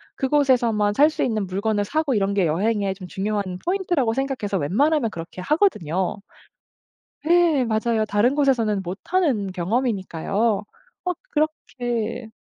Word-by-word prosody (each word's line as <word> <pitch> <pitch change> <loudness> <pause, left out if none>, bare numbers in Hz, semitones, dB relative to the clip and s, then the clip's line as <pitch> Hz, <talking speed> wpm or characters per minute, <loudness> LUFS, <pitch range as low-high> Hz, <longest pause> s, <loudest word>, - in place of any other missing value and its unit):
그곳에서만 245 -7 +2
살 295 +5 +6
수 315 - -2
있는 215 -5 -1
물건을 205 +2 -1
사고 310 +3 0
이런 200 -2 +1
게 195 -3 +2
여행의 195 +4 0
좀 185 -2 -9
중요한 195 -1 -2
포인트라고 350 - +1
생각해서 260 -6 -2
웬만하면 240 - +1
그렇게 165 +2 -8
하거든요. 190 - +1 1.1
예 335 -5 +4
맞아요. 220 0 0
다른 210 +6 +2
곳에서는 240 -8 +2
못하는 205 - -1
경험이니까요. 200 +1 -1 0.4
막 360 -1 -1
그렇게 245 -7 -2
225 Hz, 325 characters per minute, -23 LUFS, 200-275 Hz, 1.1 s, 살